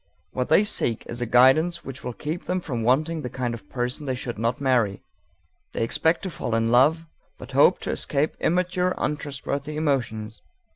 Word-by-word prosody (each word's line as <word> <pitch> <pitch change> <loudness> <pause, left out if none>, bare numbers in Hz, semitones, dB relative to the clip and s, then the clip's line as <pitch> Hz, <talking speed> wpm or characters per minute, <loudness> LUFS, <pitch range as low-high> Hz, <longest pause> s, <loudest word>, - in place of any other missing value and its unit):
What 125 -1 -2
they 205 - +5
seek 120 - 0
is 120 +1 -6
a 120 - -1
guidance 155 +8 +4
which 135 +1 -7
will 125 - -4
keep 155 +8 -5
them 185 +1 -1
from 130 -9 -4
wanting 155 +8 +1
the 125 - -5
kind 125 -2 -3
of 115 - -10
person 125 +3 -3
they 130 - 0
should 120 -3 -5
not 115 +2 0
marry. 120 -8 +1 0.7
They - - -1
expect 160 +8 +1
to 190 - -4
fall 120 -7 -3
in 115 0 +1
love, 150 +7 +4 0.3
but - - -10
hope - - +5
to - - -3
escape 145 +3 0
immature, 180 +1 +1
untrustworthy 145 0 -3
emotions. 120 -8 -2
135 Hz, 185 wpm, -24 LUFS, 120-160 Hz, 0.7 s, they